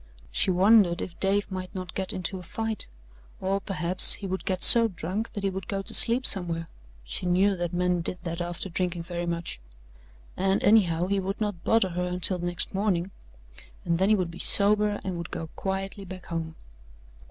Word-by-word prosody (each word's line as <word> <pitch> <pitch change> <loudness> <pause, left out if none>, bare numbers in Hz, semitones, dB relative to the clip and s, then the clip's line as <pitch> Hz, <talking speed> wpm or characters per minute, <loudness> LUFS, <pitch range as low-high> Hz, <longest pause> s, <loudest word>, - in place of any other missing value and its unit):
She - - +1
wondered 185 -1 +3
if 170 - -8
Dave 200 +1 0
might 185 +1 -7
not 185 -1 -7
get 190 -1 -2
into 185 +1 -5
a - - -10
fight 220 +5 -5 0.5
or, 195 +1 -2
perhaps, 180 -2 +6
he 200 - -10
would 190 0 -5
get 185 -1 -2
so 230 -1 +11
drunk 190 +3 -6
that 205 - -6
he 195 - -1
would 190 -2 -8
go 195 -1 -4
to - - -4
sleep 245 +2 +4
somewhere 170 -4 +1 0.4
she - - -6
knew 190 +3 +1
that 175 -1 -4
men 180 0 -1
did 180 - -2
that 170 0 -5
after 175 +2 -5
drinking 175 -1 -4
very 175 0 -6
much 170 - -5 0.8
and, 195 +1 -1
anyhow, 180 -6 +2
he 200 +1 -1
would 195 +1 -5
not 205 -5 -4
bother 225 -4 +1
her 180 +1 -4
until 180 +1 -3
next 175 0 -3
morning, 195 -2 -2 0.7
and 170 0 -1
then 190 +2 +1
he 215 - +4
would 180 -4 -3
be 170 - -12
sober 210 0 +3
and 185 -3 -5
would 170 - -7
go 160 - -7
quietly 195 +1 -5
back 185 -1 -11
home. 165 -1 -6
185 Hz, 195 wpm, -25 LUFS, 175-195 Hz, 0.8 s, so